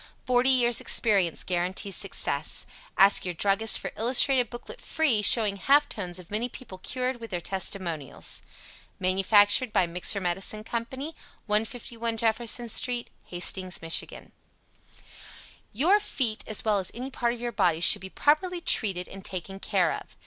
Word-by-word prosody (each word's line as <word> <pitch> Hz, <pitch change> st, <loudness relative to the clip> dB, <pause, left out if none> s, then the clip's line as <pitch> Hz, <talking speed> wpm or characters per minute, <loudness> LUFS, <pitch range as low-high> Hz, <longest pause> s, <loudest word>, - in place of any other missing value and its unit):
Forty 250 Hz, +1 st, +3 dB
years' 245 Hz, -3 st, +3 dB
experience 195 Hz, -7 st, +2 dB
guarantees 185 Hz, +2 st, -2 dB
success. -, -, -2 dB, 0.3 s
Ask 200 Hz, +1 st, +6 dB
your 180 Hz, -2 st, -4 dB
Druggist 205 Hz, +5 st, +2 dB
for -, -, -6 dB
illustrated 250 Hz, +1 st, +3 dB
Booklet 240 Hz, -, -10 dB
FREE, 280 Hz, -10 st, +2 dB
showing 210 Hz, -1 st, +5 dB
half 285 Hz, +9 st, +3 dB
tones 180 Hz, -7 st, -6 dB
of 180 Hz, 0 st, -11 dB
many 225 Hz, +4 st, -2 dB
people 230 Hz, -7 st, -11 dB
cured, 255 Hz, +5 st, -3 dB
with 230 Hz, -1 st, -8 dB
their 180 Hz, -, -3 dB
testimonials. 175 Hz, -5 st, -4 dB, 0.6 s
Manufactured 205 Hz, +5 st, +3 dB
by 200 Hz, -4 st, +2 dB
MIXER 180 Hz, +4 st, +1 dB
MEDICINE 195 Hz, +4 st, -1 dB
CO., 235 Hz, +1 st, -2 dB
151 230 Hz, -3 st, -5 dB
Jefferson 230 Hz, +1 st, +1 dB
St., 240 Hz, +1 st, -2 dB, 0.2 s
HASTINGS, 185 Hz, +1 st, -1 dB
MICH. 165 Hz, 0 st, +3 dB, 1.7 s
YOUR 340 Hz, -, +3 dB
FEET 240 Hz, -, -2 dB
as 215 Hz, -, -4 dB
well 210 Hz, -2 st, +2 dB
as 185 Hz, -, -2 dB
any 255 Hz, +3 st, -6 dB
part 240 Hz, -1 st, -1 dB
of -, -, -12 dB
your 240 Hz, 0 st, -4 dB
body, 180 Hz, -7 st, +1 dB
should 170 Hz, -, +5 dB
be 190 Hz, -, -8 dB
properly 345 Hz, -, +1 dB
treated 190 Hz, -, +2 dB
and 195 Hz, 0 st, -11 dB
taken 195 Hz, +1 st, -7 dB
care 180 Hz, -5 st, 0 dB
of. -, -, -10 dB
215 Hz, 150 wpm, -26 LUFS, 185-245 Hz, 1.7 s, Ask